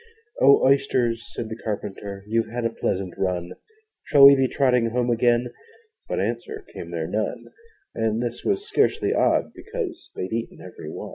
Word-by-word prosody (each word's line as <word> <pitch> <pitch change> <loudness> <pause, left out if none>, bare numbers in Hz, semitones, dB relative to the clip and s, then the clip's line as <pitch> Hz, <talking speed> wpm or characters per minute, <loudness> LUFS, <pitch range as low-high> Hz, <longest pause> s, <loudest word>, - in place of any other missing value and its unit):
'O 140 - +6
Oysters,' 130 -4 +2
said 115 - -4
the 110 - -6
Carpenter, 100 -2 -5
'You've 115 +2 0
had 120 +1 -3
a 115 - +1
pleasant 95 -5 -2
run! 90 -2 -1 0.5
Shall 140 -2 +7
we 140 0 +10
be 135 -1 +2
trotting 125 -3 +2
home 120 +1 0
again?' 120 +1 +2 0.6
But - - -1
answer 430 -1 -3
came - - -8
there - - -3
none - - -3 0.4
And 110 0 0
this 120 0 -4
was 400 +1 -1
scarcely 440 - +1
odd, - - +2
because 445 -7 -6
They'd 90 +4 -4
eaten 115 0 -4
ever - - -10
120 Hz, 160 wpm, -24 LUFS, 110-140 Hz, 0.6 s, we